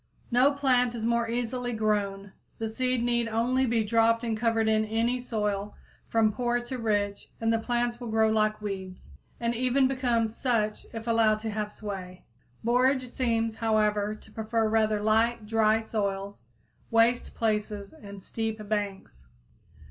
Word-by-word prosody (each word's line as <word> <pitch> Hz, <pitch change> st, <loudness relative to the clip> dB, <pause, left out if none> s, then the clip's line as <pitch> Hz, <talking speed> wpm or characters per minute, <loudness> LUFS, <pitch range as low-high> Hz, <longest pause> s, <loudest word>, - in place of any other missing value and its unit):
_ -, -, -43 dB, 0.3 s
No 250 Hz, +4 st, +5 dB
plant 250 Hz, -3 st, +2 dB
is 225 Hz, -1 st, -3 dB
more 235 Hz, 0 st, +1 dB
easily 245 Hz, +1 st, -2 dB
grown. 205 Hz, -3 st, -1 dB, 0.2 s
The 225 Hz, -, -2 dB
seed 250 Hz, +1 st, -1 dB
need 240 Hz, -1 st, +1 dB
only 245 Hz, +4 st, +1 dB
be 230 Hz, -1 st, +2 dB
dropped 230 Hz, +2 st, +3 dB
and 230 Hz, -2 st, -1 dB
covered 225 Hz, 0 st, +1 dB
in 220 Hz, 0 st, +3 dB
any 230 Hz, +3 st, 0 dB
soil, 210 Hz, -4 st, -2 dB, 0.3 s
from 225 Hz, -1 st, +3 dB
poor 240 Hz, +1 st, 0 dB
to 245 Hz, +1 st, -6 dB
rich, 205 Hz, -3 st, -1 dB
and 225 Hz, 0 st, +1 dB
the 225 Hz, -, +2 dB
plants 240 Hz, 0 st, -1 dB
will 245 Hz, -, -6 dB
grow 220 Hz, 0 st, +3 dB
like 215 Hz, -1 st, +1 dB
weeds, 190 Hz, -2 st, -6 dB, 0.3 s
and 235 Hz, 0 st, 0 dB
even 255 Hz, +2 st, +2 dB
become 245 Hz, -4 st, +1 dB
such 220 Hz, -2 st, -1 dB
if 225 Hz, 0 st, -7 dB
allowed 225 Hz, -2 st, +3 dB
to 220 Hz, 0 st, -3 dB
have 210 Hz, 0 st, -3 dB
sway. 190 Hz, -4 st, -7 dB, 0.4 s
Borage 255 Hz, +2 st, +2 dB
seems, 230 Hz, -3 st, 0 dB
however, 215 Hz, -2 st, +1 dB
to 215 Hz, -, -17 dB
prefer 220 Hz, +1 st, 0 dB
rather 215 Hz, -1 st, +2 dB
light, 220 Hz, +1 st, +2 dB
dry 220 Hz, 0 st, +3 dB
soils, 200 Hz, -, -3 dB, 0.5 s
waste 230 Hz, +2 st, +2 dB
places 210 Hz, -2 st, -2 dB
and 200 Hz, -9 st, -11 dB
steep 220 Hz, -2 st, -4 dB
banks. 195 Hz, -, -4 dB
225 Hz, 155 wpm, -28 LUFS, 215-240 Hz, 0.5 s, No